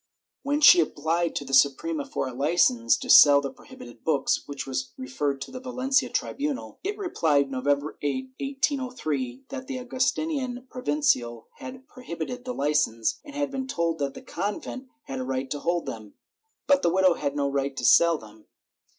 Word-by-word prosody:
Then 290 +2 0
she 350 +4 +9
applied 165 - 0
to 145 - -3
the 135 - -8
Suprema 280 - +2
for 270 - -3
a 130 - -6
licence 125 -5 +2
to - - -8
sell 145 -1 +8
the 140 -1 -4
prohibited 120 -1 -14
books, 145 -4 +1
which 140 -1 -5
was 130 0 -4
referred 135 +2 -2
to - - -7
the 255 - -7
Valencia 255 0 0
tribunal. 285 -1 -3
It 405 +2 -3
repHed, 155 - +1
November 140 +3 -1
8, 260 - -3
1803, 250 - -2
that 265 -1 -7
the 270 -2 -4
Augustinian 255 0 -2
provincial 125 - 0
had 260 0 -9
exhibited 245 +1 -6
the 250 - -3
licence, 140 -6 0
and 290 -2 -12
had 285 -1 -1
been 265 -1 -4
told 170 - -1
that 140 -1 -2
the - - -10
convent 230 +5 -5 0.2
had 135 -1 -6
a - - -2
right 130 +1 -3
to 145 - -2
hold 170 +1 -1
them, 110 -2 -8 0.5
but 280 -1 +4
the - - +2
widow 185 +1 +4
had 145 -3 -3
no 140 -1 0
right 140 0 -2
to - - -2
sell 170 -1 +6
them. 110 -3 -16
165 Hz, 175 wpm, -26 LUFS, -, 0.5 s, she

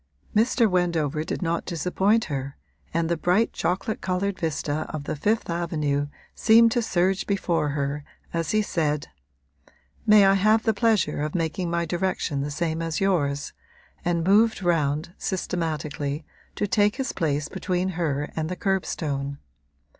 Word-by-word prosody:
Mr. 230 +2 +4
Wendover 165 -5 0
did 160 - -3
not 170 0 0
disappoint 190 +6 +1
her, 140 -2 -4 0.3
and 165 0 0
the 170 - +1
bright 180 +7 +2
chocolate 195 +4 -1
coloured 190 +1 -1
vista 155 -2 -2
of 155 -2 -5
the - - -3
Fifth 215 +10 0
Avenue 155 -4 -1 0.3
seemed 230 +1 +5
to 240 - +1
surge 190 -2 +1
before 175 -6 0
her 145 0 -2 0.3
as 165 -2 -1
he 215 0 +2
said, 150 - -1 1.0
'May 210 -2 +8
I 195 - +6
have 215 +3 +3
the 220 - +2
pleasure 215 -9 +1
of 150 +2 -3
making 170 +1 -1
my 170 0 0
direction 175 -4 -1
the 145 - -2
same 160 +2 -2
as 165 -1 -2
yours?' 145 -8 0 0.5
and 170 -2 0
moved 205 +2 +4
round, 160 -1 +1
systematically, 155 -5 -2 0.3
to - - 0
take 205 +2 +2
his 265 -2 -2
place 150 -3 -1
between 185 -1 -1
her 150 -5 -2
and 160 0 -2
the 180 - -3
curbstone. 150 -8 -2
170 Hz, 150 wpm, -25 LUFS, 150-195 Hz, 1.0 s, May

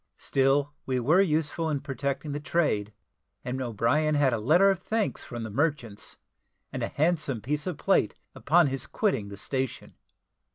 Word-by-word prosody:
Still 140 +2 +1
we 130 -1 0
were 155 +10 +4
useful 160 -2 0
in 145 -2 0
protecting 140 +1 -3
the 145 - -3
trade, 145 -10 0 0.5
and 130 +1 -3
O'Brien 130 +6 +1
had 140 -3 +3
a 115 - 0
letter 175 - +5
of 190 - -2
thanks 220 +3 -2
from 120 -2 -6
the 110 - -6
merchants, 130 -5 -2 0.6
and - - -3
a - - 0
handsome 150 -5 0
piece 145 - -3
of 180 -5 -3
plate - - +2 0.2
upon 170 +3 +3
his 135 -1 -2
quitting 135 - 0
the 100 - -8
station. 130 +4 -3
145 Hz, 165 wpm, -27 LUFS, 125-160 Hz, 0.6 s, letter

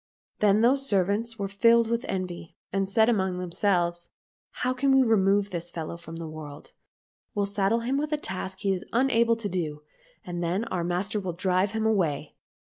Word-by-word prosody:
Then 210 0 +4
those 270 +3 +3
servants 205 +4 +1
were 200 - -2
filled 230 +3 +4
with 235 +2 -1
envy, 180 -3 -4 0.2
and 195 0 0
said 220 +2 +4
among 190 -6 +1
themselves, 175 -1 0 0.2
" - - -85
How 255 0 +2
can 270 +2 +1
we 265 - +6
remove 200 -3 +2
this 175 -1 -3
fellow 165 -1 -5
from 170 -1 -10
the 165 -1 -6
world? 155 -2 -9 0.6
We'll 205 -1 +1
saddle 200 +3 +1
him 255 +4 -1
with 300 +1 -3
a 300 - +1
task 190 -6 -5
he 195 -1 +1
is 185 - -4
unable 235 -2 +3
to 225 -2 -4
do, 155 -6 -3 0.4
and 175 -1 -4
then 180 +6 0
our 180 -6 -2
master 180 +5 -1
will 185 -3 -4
drive 185 +3 +1
him 220 0 -1
away." 165 -9 0
195 Hz, 190 wpm, -27 LUFS, 175-225 Hz, 0.6 s, we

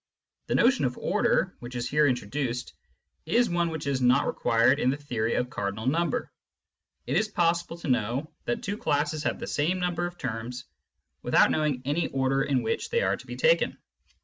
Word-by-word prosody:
The - - 0
notion 250 - +4
of 125 0 -2
order, - - +1
which 120 +1 -9
is 120 0 -2
here 150 +3 +3
introduced, 125 0 -2 0.5
is 235 +5 +2
one 170 -1 +1
which 160 -2 -5
is 135 -2 0
not 125 +2 +4
required 120 +5 +2
in 125 - +2
the 135 - 0
theory 115 -6 -2
of 125 +1 -1
cardinal 100 +2 -3
number. 170 - 0 0.7
It - - 0
is 215 - +2
possible 170 -3 0
to 170 - -7
know 125 +4 -1
that 240 - -2
two 205 +1 -3
classes 150 -3 0
have - - 0
the - - -6
same 170 +6 0
number 175 -1 -1
of 175 0 -10
terms 120 -1 -5 0.6
without - - +4
knowing 150 -5 0
any 150 +5 0
order 135 0 0
in 135 -3 +1
which 110 - -2
they 475 0 +1
are - - +2
to - - -14
be - - -6
taken. - - +2
145 Hz, 190 wpm, -27 LUFS, 125-170 Hz, 0.7 s, notion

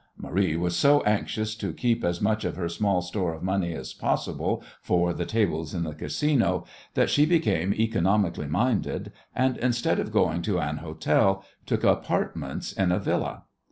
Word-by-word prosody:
Marie 95 -4 0
was 90 0 0
so 145 +10 +5
anxious 110 +1 0
to 110 - -4
keep 120 -2 0
as 85 0 0
much 110 +1 +1
of - - -2
her 85 -2 -2
small 90 +1 0
store 90 -2 -2
of 80 - -10
money 95 -2 0
as - - -6
possible - - -1 0.2
for 90 -1 +1
the - - -3
tables 85 -8 0
in 85 - -1
the 80 -2 -4
Casino 140 - 0 0.3
that - - +3
she 145 - +4
became 155 - +2
economically 100 -6 +1
minded, 105 - 0 0.2
and, 130 0 +2
instead 120 -1 +1
of - - -2
going 85 +2 +2
to 95 +1 0
an 75 -2 -1
hotel, 85 +5 +1 0.2
took - - 0
apartments - - 0
in 95 -2 +1
a 90 - +2
Villa. - - -2
95 Hz, 170 wpm, -26 LUFS, 85-110 Hz, 0.3 s, so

